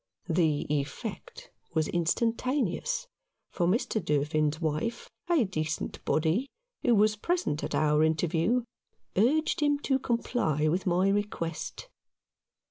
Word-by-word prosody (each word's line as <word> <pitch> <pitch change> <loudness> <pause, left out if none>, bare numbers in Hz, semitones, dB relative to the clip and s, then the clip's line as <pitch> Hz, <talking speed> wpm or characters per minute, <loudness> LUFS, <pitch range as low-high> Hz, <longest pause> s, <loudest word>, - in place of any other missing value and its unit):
The 160 -3 +2
effect 165 - -5 0.2
was 155 -1 +2
instantaneous, 250 - 0 0.5
for 175 - 0
Mr. 215 +1 0
Durfin's 150 0 +1
wife, 160 +8 -2 0.2
a 335 -7 +4
decent 155 -5 -3
body, 170 - +1 0.3
who 240 -2 +4
was 215 +1 +4
present 340 - -1
at - - -2
our 150 0 +3
interview, 165 +9 +1 0.5
urged 280 +11 +2
him 290 -1 +3
to 270 -2 +1
comply 230 - 0
with 180 +4 -1
my 180 +2 +3
request. 200 - -3
180 Hz, 115 wpm, -29 LUFS, 155-240 Hz, 0.5 s, a